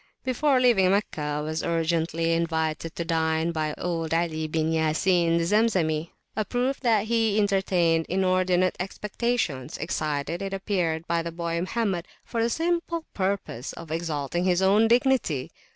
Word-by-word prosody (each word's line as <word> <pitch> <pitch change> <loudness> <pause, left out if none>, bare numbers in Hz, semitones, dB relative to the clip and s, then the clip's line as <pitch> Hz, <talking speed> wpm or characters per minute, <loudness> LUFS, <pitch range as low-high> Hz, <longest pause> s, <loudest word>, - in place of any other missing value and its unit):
Before 265 +1 +2
leaving 230 -7 +4
Meccah 200 -5 0
I 150 0 -2
was 155 +1 -3
urgently 165 0 0
invited 160 -1 -1
to 170 - -3
dine 160 0 +1
by 155 -2 -2
old 165 -2 -2
Ali 160 -2 -1
bin 160 +1 0
Ya 160 -1 +1
Sin, 170 -1 +2
the 170 - +1
Zemzemi; 170 -6 +1 0.3
a 215 - 0
proof 250 +6 -1
that 225 -5 +2
he 225 -2 +1
entertained 185 -5 +2
inordinate 185 0 +2
expectations, 195 - -2
excited, 155 +1 -2
it 195 0 -3
appeared, 175 -5 -1
by 170 -1 0
the 170 0 -5
boy 170 0 -2
Mohammed, 185 -1 -1 0.2
for 230 - -2
the 230 - +2
simple 335 +2 -1
purpose 185 - -2
of 165 -2 -10
exalting 165 0 -2
his 180 0 +2
own 205 +4 +5
dignity. 240 - +2
175 Hz, 150 wpm, -26 LUFS, 160-205 Hz, 0.3 s, own